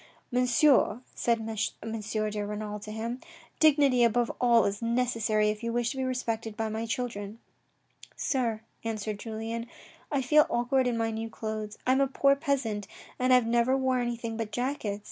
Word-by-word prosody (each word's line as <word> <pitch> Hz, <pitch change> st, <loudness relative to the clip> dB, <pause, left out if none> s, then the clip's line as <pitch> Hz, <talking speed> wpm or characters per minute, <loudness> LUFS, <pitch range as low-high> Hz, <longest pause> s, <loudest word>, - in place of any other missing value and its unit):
" -, -, -36 dB
Monsieur," 250 Hz, 0 st, +4 dB
said 235 Hz, -1 st, +1 dB
M. 225 Hz, 0 st, -3 dB
de 215 Hz, -1 st, -2 dB
Renal 210 Hz, 0 st, -4 dB
to 215 Hz, +1 st, -8 dB
him, 230 Hz, +3 st, -4 dB, 0.2 s
" -, -, -26 dB
dignity 285 Hz, -5 st, +5 dB
above 235 Hz, +1 st, +2 dB
all 235 Hz, -2 st, +5 dB
is 200 Hz, +2 st, -2 dB
necessary 230 Hz, -3 st, +1 dB
if 210 Hz, +1 st, -3 dB
you 230 Hz, 0 st, -2 dB
wish 240 Hz, 0 st, 0 dB
to 270 Hz, -, -7 dB
be 265 Hz, -, -1 dB
respected 230 Hz, -4 st, -2 dB
by 220 Hz, -1 st, -1 dB
my 220 Hz, +1 st, -3 dB
children." 225 Hz, -5 st, -4 dB, 0.4 s
" -, -, -21 dB
Sir," 235 Hz, -5 st, -1 dB, 0.2 s
answered 215 Hz, -2 st, -3 dB
Julien, 225 Hz, +1 st, -4 dB, 0.2 s
" -, -, -27 dB
I 280 Hz, -2 st, +1 dB
feel 300 Hz, +4 st, +5 dB
awkward 250 Hz, +2 st, +1 dB
in 240 Hz, -2 st, 0 dB
my 225 Hz, 0 st, 0 dB
new 225 Hz, +1 st, -4 dB
clothes. 215 Hz, -1 st, -5 dB
I 255 Hz, -, +3 dB
am 265 Hz, +1 st, +3 dB
a 275 Hz, -, +3 dB
poor 275 Hz, +1 st, +3 dB
peasant 265 Hz, -9 st, -1 dB, 0.3 s
and 255 Hz, 0 st, +2 dB
have 250 Hz, -2 st, +6 dB
never 240 Hz, +3 st, +2 dB
wore 260 Hz, -1 st, +1 dB
anything 235 Hz, -2 st, -3 dB
but 225 Hz, -2 st, -3 dB
jackets. 245 Hz, -5 st, -2 dB
230 Hz, 185 wpm, -29 LUFS, 220-250 Hz, 0.4 s, have